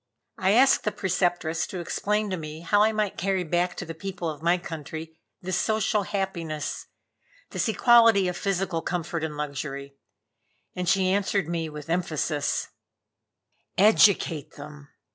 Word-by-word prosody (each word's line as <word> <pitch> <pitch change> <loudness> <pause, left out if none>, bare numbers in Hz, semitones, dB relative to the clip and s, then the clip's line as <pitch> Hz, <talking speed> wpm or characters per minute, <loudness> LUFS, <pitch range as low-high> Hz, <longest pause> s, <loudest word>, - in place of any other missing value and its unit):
I 190 +2 +3
asked 265 +4 +5
the 210 - 0
Preceptress 175 -4 0
to 185 - -6
explain 210 +4 -1
to - - 0
me 155 -1 -7
how 205 +5 +3
I 215 +1 +4
might 210 -2 -2
carry 190 0 0
back 175 +2 0
to - - -4
the 165 - -6
people 180 +1 -5
of 150 -1 -10
my 170 +2 +3
country 160 -2 -7 0.3
this 185 -1 -1
social 220 0 +1
happiness, 175 -7 -3 0.6
this - - -1
equality 230 -4 +5
of 180 - -2
physical 190 -3 -1
comfort 170 -2 -3
and 150 -2 -4
luxury; 140 -1 -5 0.8
and 180 -1 -1
she 190 -1 +3
answered 195 -3 +1
me 165 -1 -2
with 150 -1 -9
emphasis: 160 -3 -1 1.1
"Educate 195 -6 +4
them. 145 0 -11
175 Hz, 145 wpm, -26 LUFS, 160-195 Hz, 1.1 s, asked